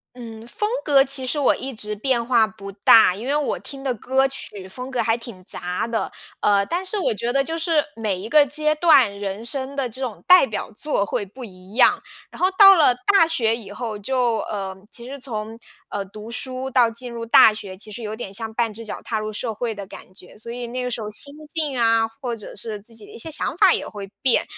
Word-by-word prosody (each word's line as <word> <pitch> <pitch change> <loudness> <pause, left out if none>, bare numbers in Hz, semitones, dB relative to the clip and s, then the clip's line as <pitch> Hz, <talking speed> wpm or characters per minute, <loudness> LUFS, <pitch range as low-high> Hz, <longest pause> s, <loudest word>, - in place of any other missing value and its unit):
嗯， 225 -2 -9
风 420 - -2
格 275 -2 +5
其 270 -1 +3
实 295 +4 0
我 280 - +3
一 270 +1 -5
直 210 -2 -3
变 235 +2 0
化 235 -2 +4
不 215 -2 -10
大， 200 -1 +6
因 220 - -7
为 285 - +1
我 295 -1 0
听 275 -2 -9
的 265 -2 -1
歌 265 +4 +1
曲 205 -7 -7
风 250 +7 -7
格 250 -2 0
还 225 0 +2
挺 230 -5 -10
杂 180 +5 -3
的。 230 -1 -2 0.3
呃， 200 -1 +3
但 350 - -2
是 405 +2 -3
我 355 - +1
觉 235 +3 -2
得 275 - +2
就 325 +4 -3
是 325 -2 +2
每 215 -4 -2
一 205 - -6
个 295 +2 +5
阶 305 +2 0
段 280 -11 +4
人 200 +3 -4
生 265 +2 -3
的 275 -3 -2
这 255 +4 -7
种 245 -5 -4
代 365 -4 +8
表 220 - -5
作 250 -6 -1
会 205 - -2
不 245 +6 -10
一 185 0 -13
样。 260 - +5 0.3
然 - - -13
后 370 +1 +3
到 390 -2 +10
了 300 -7 +5 0.2
大 390 -4 +6
学 235 -9 +1
以 205 -4 -9
后， 220 0 -5
就 240 +1 0
呃， 195 -2 -4 0.2
其 235 0 -8
实 275 +2 -7
从， 225 -4 -6 0.3
呃， 205 - -4
读 210 +3 -11
书 255 +2 -3
到 245 -3 +3
进 245 +2 -5
入 235 -1 -6
大 225 -1 +7
学， 195 -3 -8
其 215 - -7
实 215 +3 -8
有 215 0 -4
点 220 -3 -7
像 220 +1 -2
半 230 -1 0
只 230 +2 -8
脚 215 - -6
踏 225 - -3
入 215 0 -3
社 225 +2 -3
会 225 +1 -3
的 200 -2 -8
感 185 - -12
觉， 185 +1 -13
所 230 +2 -8
以 240 0 -5
那 250 +1 -4
个 250 - -3
时 230 - -3
候 210 - -5
心 280 +7 -1
境 295 -5 -2
啊， 225 -1 +3 0.2
或 245 -2 -3
者 210 - -10
是 215 0 -4
自 230 +2 -13
己 215 -2 -8
的 - - -15
一 - - -9
些 315 +8 -6
想 305 - -1
法 380 -1 +6
也 - - -1
会 200 -2 -9
变。 255 -3 +3
235 Hz, 265 characters per minute, -22 LUFS, 215-270 Hz, 0.3 s, 到